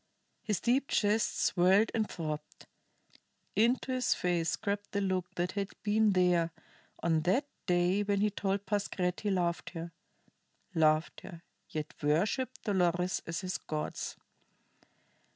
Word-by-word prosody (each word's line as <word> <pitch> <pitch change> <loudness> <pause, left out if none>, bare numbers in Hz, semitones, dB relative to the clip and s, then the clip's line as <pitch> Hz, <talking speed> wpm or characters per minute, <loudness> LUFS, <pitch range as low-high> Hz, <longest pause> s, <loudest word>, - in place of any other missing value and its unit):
His 210 -4 -1
deep 260 +4 +2
chest 210 +1 +1
swelled 190 +4 +4
and 220 -2 0
throbbed; 155 -3 -5 0.9
into 240 +5 +2
his 255 -1 +2
face 175 -2 0
crept 205 -1 -3
the 200 - +1
look 185 -2 -1
that 175 +1 -1
had 200 -1 -2 0.2
been 215 0 +3
there 180 -2 +3 0.5
on 160 -2 +2
that 190 - +2 0.2
day 180 +3 +3
when 200 -1 +1
he 210 +1 +2
told 200 0 -1
Pascherette 190 -3 -1
he 210 - -1
loved 175 -3 0
her 165 +1 -5 0.8
loved 155 -1 +2
her, 170 -1 -10 0.3
yet 155 -1 -4
worshiped 195 - 0
Dolores 180 -3 +1
as 165 +1 -3
his 185 -1 -3
gods. 155 -1 -4
185 Hz, 135 wpm, -31 LUFS, 170-205 Hz, 0.9 s, swelled